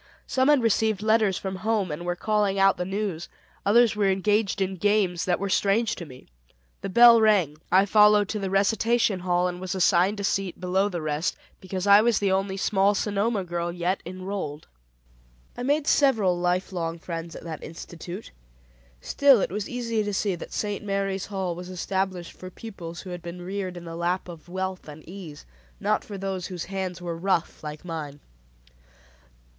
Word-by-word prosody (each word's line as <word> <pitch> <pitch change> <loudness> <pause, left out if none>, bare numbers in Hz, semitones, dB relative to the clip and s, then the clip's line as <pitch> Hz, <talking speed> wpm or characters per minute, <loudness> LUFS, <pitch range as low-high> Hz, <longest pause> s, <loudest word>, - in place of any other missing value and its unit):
Some 260 0 +1
had 290 -5 +4
received 220 -2 +1
letters 215 -3 +3
from 190 -1 -4
home 210 -3 0
and 170 +4 -5
were 175 - 0
calling 210 0 0
out 195 0 +4
the 180 - -2
news; 190 -3 -3 0.3
others 225 +2 +4
were 205 -2 +2
engaged 205 +2 +1
in 190 0 -1
games 200 -3 +1
that 180 -1 +1
were 200 - -2
strange 210 +3 +2
to 170 - -7
me. 130 -2 -13 0.6
The - - -4
bell 235 +3 +8
rang, 190 -9 +3
I 190 +2 +5
followed 210 0 +5
to 215 - -2
the 195 -1 -3
recitation 215 +1 +2
hall, 180 0 +1
and 180 0 -5
was 185 0 -3
assigned 190 +2 +3
a - - -3
seat 195 -2 -1
below 185 +3 +1
the 175 -4 -4
rest, 155 +2 -1 0.2
because 185 0 -4
I 200 +1 +8
was 230 -1 +3
the 200 -2 +1
only 190 0 0
small 200 +1 +2
Sonoma 205 +1 0
girl 175 -1 -3
yet 175 +2 -1
enrolled. 185 -4 -5 0.9
I - - -6
made 285 +4 +1
several 225 -13 +3
life 180 +2 0
long 165 -2 -3
friends 165 0 -6
at - - -9
that 160 -3 -7
institute; 170 +4 -8 0.7
still 275 - +5
it - - -1
was 205 +1 -3
easy 230 -3 -1
to 205 -1 -3
see 200 0 0
that 175 - -8
"St. 205 -1 -3
Mary's 195 -1 -2
Hall" 190 -3 -2
was 180 +1 -8
established 185 -1 -2
for 185 - -10
pupils 180 -5 -8
who 185 - -9
had 175 -1 -6
been 175 +1 -8
reared 185 -1 -4
in 175 - -9
the 165 0 -7
lap 175 +2 -1
of 170 -1 -11
wealth 185 0 -4
and 150 +1 -11
ease; 175 -5 -10 0.3
not - - 0
for 205 - -8
those 190 -2 -3
whose 180 -3 -5
hands 185 -2 -4
were 170 -1 -3
rough 170 -2 -1
like 150 +2 -7
mine. 155 -4 -6
190 Hz, 185 wpm, -25 LUFS, 175-205 Hz, 0.9 s, bell